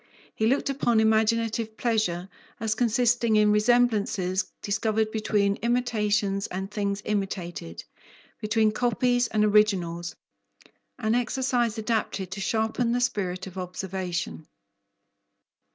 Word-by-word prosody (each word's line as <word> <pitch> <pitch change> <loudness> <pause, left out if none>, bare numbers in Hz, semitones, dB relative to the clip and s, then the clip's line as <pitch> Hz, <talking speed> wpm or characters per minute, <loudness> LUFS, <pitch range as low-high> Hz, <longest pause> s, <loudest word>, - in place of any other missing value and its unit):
He 220 - 0
looked 270 +5 +1
upon 240 -4 +2
imaginative 220 0 +1
pleasure 210 -7 0 0.3
as 220 -1 0
consisting 235 0 +2
in 210 0 +5
resemblances 210 -4 +2
discovered 215 +1 0
between 205 -2 +1
imitations 215 -5 0
and 190 +2 -5
things 200 -1 -2
imitated, 180 - -4 0.6
between 215 0 +2
copies 245 +1 +1
and 215 -1 +1
originals, 185 -5 +2 0.8
an 220 -3 0
exercise 245 -1 0
adapted 215 -4 -2
to 195 +1 -5
sharpen 225 +3 0
the 245 - +1
spirit 200 -7 -1
of 190 0 -8
observation. 180 -3 -4
215 Hz, 105 wpm, -26 LUFS, 195-230 Hz, 0.8 s, in